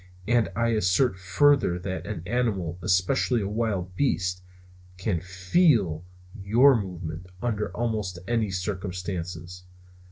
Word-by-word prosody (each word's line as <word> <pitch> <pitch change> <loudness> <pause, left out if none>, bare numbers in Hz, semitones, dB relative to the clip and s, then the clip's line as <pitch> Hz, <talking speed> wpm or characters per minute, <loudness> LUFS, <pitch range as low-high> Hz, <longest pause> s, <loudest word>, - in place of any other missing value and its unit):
And 120 -5 +3
I 115 0 +1
assert 105 +1 +2
further 95 +2 +3
that 95 +2 -5
an 100 -6 -5
animal, 100 -8 -1
especially 95 +8 +2
a 100 - -2
wild 100 -4 -2
beast, 90 -9 0 0.6
can 90 -3 -1
feel 95 - +2 0.4
your 120 +8 +5
movements 90 -4 -5
under 105 -1 -1
almost 110 -6 -2
any 115 -3 +1
circumstances. 90 -2 -4
95 Hz, 115 wpm, -26 LUFS, 90-115 Hz, 0.6 s, your